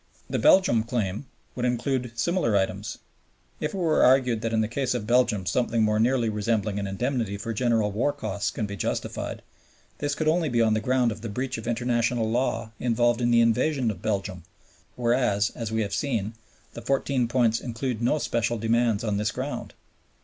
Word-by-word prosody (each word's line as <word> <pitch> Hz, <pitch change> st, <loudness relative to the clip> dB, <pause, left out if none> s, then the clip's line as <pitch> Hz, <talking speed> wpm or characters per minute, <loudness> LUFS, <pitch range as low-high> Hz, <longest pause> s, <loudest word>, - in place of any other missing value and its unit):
The -, -, -2 dB
Belgian 185 Hz, -12 st, +5 dB
claim 110 Hz, 0 st, -3 dB, 0.3 s
would 125 Hz, -, -4 dB
include 125 Hz, 0 st, -1 dB
similar 170 Hz, -, +1 dB
items. 95 Hz, -1 st, -2 dB, 0.6 s
If -, -, -3 dB
it -, -, -3 dB
were 165 Hz, -4 st, +2 dB
argued 125 Hz, -3 st, +4 dB
that 115 Hz, -1 st, -2 dB
in 110 Hz, -1 st, +2 dB
the 110 Hz, -, 0 dB
case 125 Hz, +2 st, -1 dB
of 115 Hz, -4 st, -3 dB
Belgium 120 Hz, -4 st, +2 dB
something 115 Hz, +5 st, +1 dB
more 105 Hz, 0 st, +2 dB
nearly 120 Hz, +1 st, +2 dB
resembling 105 Hz, -1 st, -1 dB
an 100 Hz, -, -3 dB
indemnity 110 Hz, 0 st, -2 dB
for 115 Hz, +3 st, -4 dB
general 115 Hz, -2 st, +1 dB
war 120 Hz, +8 st, +1 dB
costs 100 Hz, -5 st, -3 dB
can 110 Hz, -, -3 dB
be 100 Hz, 0 st, -5 dB
justified, 95 Hz, -, -3 dB, 0.6 s
this 145 Hz, 0 st, -1 dB
could 155 Hz, -, -2 dB
only 160 Hz, 0 st, +2 dB
be 120 Hz, -2 st, 0 dB
on 110 Hz, -1 st, +4 dB
the 110 Hz, -, +1 dB
ground 125 Hz, 0 st, +1 dB
of 110 Hz, 0 st, -7 dB
the 115 Hz, -, -5 dB
breach 125 Hz, +2 st, -3 dB
of 115 Hz, -, -8 dB
International 120 Hz, -1 st, 0 dB
Law 115 Hz, -1 st, -1 dB
involved 120 Hz, 0 st, +1 dB
in 120 Hz, -, +2 dB
the 120 Hz, 0 st, +5 dB
invasion 115 Hz, +2 st, +2 dB
of 95 Hz, -4 st, -10 dB
Belgium, 100 Hz, -4 st, -2 dB, 0.5 s
whereas, 120 Hz, -4 st, +1 dB
as 115 Hz, -2 st, -5 dB
we 110 Hz, 0 st, +1 dB
have 100 Hz, -, -5 dB
seen, 115 Hz, -7 st, -1 dB, 0.4 s
the -, -, -8 dB
Fourteen 135 Hz, -2 st, 0 dB
Points 115 Hz, -2 st, +2 dB
include 120 Hz, -1 st, -3 dB
no 125 Hz, +6 st, +2 dB
special 115 Hz, -4 st, -1 dB
demands 115 Hz, -1 st, +1 dB
on 105 Hz, -3 st, 0 dB
this 105 Hz, 0 st, 0 dB
ground. -, -, -5 dB
115 Hz, 190 wpm, -26 LUFS, 110-125 Hz, 0.6 s, Belgian